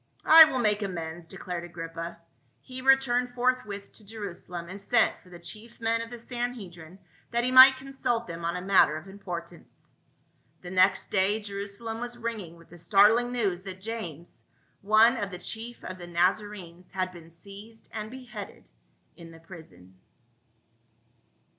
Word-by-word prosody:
"I 320 0 +11
will 285 -4 -2
make 210 -3 +1
amends," 170 -3 -5
declared 175 0 -6
Agrippa. 165 0 -7 0.4
He 255 0 -9
returned 250 -2 +3
forthwith 240 -5 -1
to 220 - -10
Jerusalem, 185 -5 -7
and 195 +3 -9
sent 225 +3 +2
for 180 - -20
the 175 - -11
chief 215 +7 -12
men 230 0 0
of 230 - -7
the 240 - -8
Sanhedrim 225 -9 -6 0.3
that 235 0 0
he 250 - 0
might 260 +1 +9
consult 260 -3 -2
them 170 0 -8
on 170 +1 -1
a 180 - -4
matter 190 -5 +4
of 160 - -10
importance. 175 -3 -9 0.7
The 180 - -8
next 185 +1 +3
day 200 +2 +2
Jerusalem 205 +2 -6
was 245 0 -5
ringing 220 -8 -5
with 165 - -19
the 175 - -12
start 205 +4 +6
ling 245 +1 0
news 200 -8 -1
that 190 -1 -8
James, 185 -7 -7 0.4
one 220 +5 +5
of 200 -3 -3
the 180 - -7
chief 225 +6 -7
of 185 0 -7
the 175 - -9
Naza 180 +5 +1
renes, 180 -3 -12
had 185 -1 -2
been 170 -2 -13
seized 200 +6 -12
and 215 0 -5
beheaded 240 -5 -10 0.4
in 165 -1 -12
the 165 0 -14
prison. 95 - -15
200 Hz, 165 wpm, -27 LUFS, 175-230 Hz, 0.7 s, I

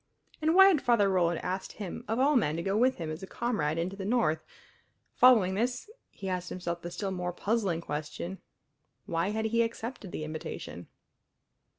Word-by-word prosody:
And 315 +2 +2
why 385 +1 +9
had 325 -7 +3
Father 235 -4 +4
Roland 175 -3 +2
asked 185 +1 -3
him 200 -4 -6
of 225 - -1
all 280 +3 +4
men 155 - +2
to 170 - -3
go 195 +2 0
with 255 +4 +3
him 160 -2 -4
as 155 +4 -6
a 190 - -7
comrade 180 -12 -1
into 175 +4 -2
the 195 - -6
North? 195 -8 +1 0.7
Following 220 -7 +6
this 245 - -2 0.2
he 195 - -8
asked 180 -1 -2
himself 170 -1 -4
the 175 - -5
still 190 +3 -3
more 180 -1 -2
puzzling 195 -3 0
question: 150 +5 -5 0.7
Why 170 +3 0
had 220 +1 -1
he 230 +1 +2
accepted 230 -3 -4
the - - -4
invitation? 155 0 -6
190 Hz, 185 wpm, -30 LUFS, 170-230 Hz, 0.7 s, why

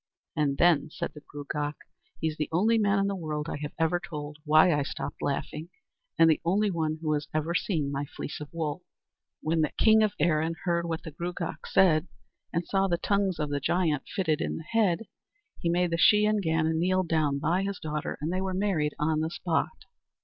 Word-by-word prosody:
"And 140 -2 +1
then," 165 -3 +4
said - - -5
the 150 - -11
Gruagach 145 0 -4 0.4
"he's 160 -1 -1
the 150 - -3
only 220 +7 +3
man 205 -1 +3
in 195 - +2
the 200 - 0
whole 190 - -6
world 150 -1 -3
I 165 - -3
have 150 0 -6
ever 165 +2 +1
told 150 -5 -7
why 155 +3 +6
I 145 - +1
stopped 140 - -5
laughing, 150 +3 -3 0.5
and 165 - +7
the 160 - +3
only 200 +4 +2
one 160 -2 -1
who 155 -1 +1
has 145 -1 -2
ever 155 +2 0
seen 160 -6 0
my 140 +1 -2
fleece 145 - -7
of 145 -1 -8
wool." 160 0 -3 0.6
When 160 +1 +1
the 155 - +2
king 220 0 +6
of 215 -2 +2
Erin 160 +1 +2
heard 170 -1 0
what 165 -1 -3
the 160 - -7
Gruagach 170 +2 -5
said, 180 -3 +4 0.4
and 170 0 -1
saw 195 +1 +1
the 175 -2 +1
tongues 200 -1 0
of 150 -2 -2
the 145 - 0
giant 160 -1 0
fitted 160 -6 0
in - - -2
the 160 - -7
head, 205 0 +1 0.6
he 170 - -1
made 175 0 +1
the 165 - 0
Shee 210 +4 +6
an 215 0 +2
Gannon 160 -2 +1
kneel 185 +2 +2
down 155 -4 +1
by 165 +6 +1
his 195 0 -2
daughter, 150 -1 -3
and 160 +4 -2
they 185 - 0
were 190 -1 -2
married 185 -7 0
on 155 +1 +1
the 160 +1 -1
spot. 175 - -2
165 Hz, 215 wpm, -28 LUFS, 150-185 Hz, 0.6 s, and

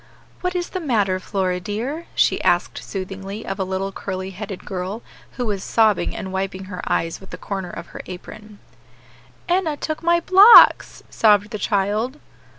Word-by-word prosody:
"What 360 0 -3
is 350 -1 -2
the 370 - -4
matter, 210 - 0
Flora, 185 -1 -2
dear?" 235 - -4
she - - +2
asked - - +1
soothingly 195 +2 -7
of 195 0 -5
a - - +1
little 190 +1 -3
curly 190 -1 -5
headed 195 0 -8
girl, 190 +4 -5 0.3
who 245 - -3
was 200 -3 -2
sobbing, 220 -4 +2
and 190 0 -6
wiping 190 0 -3
her 185 -1 -7
eyes 165 +2 -1
with 190 - -14
the - - -8
corner 190 -3 -5
of - - -8
her - - -7
apron. 210 +3 -10 0.9
"Enna 345 -4 0
took 310 +1 -4
my 340 +1 +3
blocks," 385 +6 +7
sobbed 210 -1 +3
the 215 - -5
child. 210 +7 -1
205 Hz, 165 wpm, -21 LUFS, 190-245 Hz, 0.9 s, blocks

